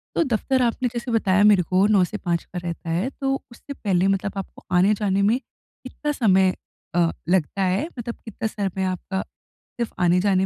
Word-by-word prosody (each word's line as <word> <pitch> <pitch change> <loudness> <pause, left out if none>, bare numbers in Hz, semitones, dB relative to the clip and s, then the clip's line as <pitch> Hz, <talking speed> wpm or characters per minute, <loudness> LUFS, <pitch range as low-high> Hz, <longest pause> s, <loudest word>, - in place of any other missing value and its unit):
तो 335 - +3
दफ़्तर 260 +1 0
आपने 245 +1 +1
जैसे 240 +1 -4
बताया 205 -3 +3
मेरे 205 -3 +6
को 185 +3 +2
9 205 -3 +4
से 210 +4 -3
5 170 -3 -1
का 185 - -9
रहता 170 -1 -5
है 175 +10 0
तो 270 0 +1 0.2
उससे 280 +4 -9
पहले 190 -6 +1
मतलब 195 +1 0
आपको 195 - -7
आने-जाने 200 +1 +3
में 215 +5 +3
कितना 280 +2 -8
समय 190 -8 +3 0.4
अ, 170 -2 +3 0.2
लगता 190 +2 +1
है 190 +10 +1
मतलब 235 0 -4
कितना 220 0 -3
समय 195 -3 -3
आपका 185 +1 -2 0.6
सिर्फ़ 235 - -2
आने-जाने 185 +2 +3
195 Hz, 180 wpm, -23 LUFS, 185-230 Hz, 0.6 s, मेरे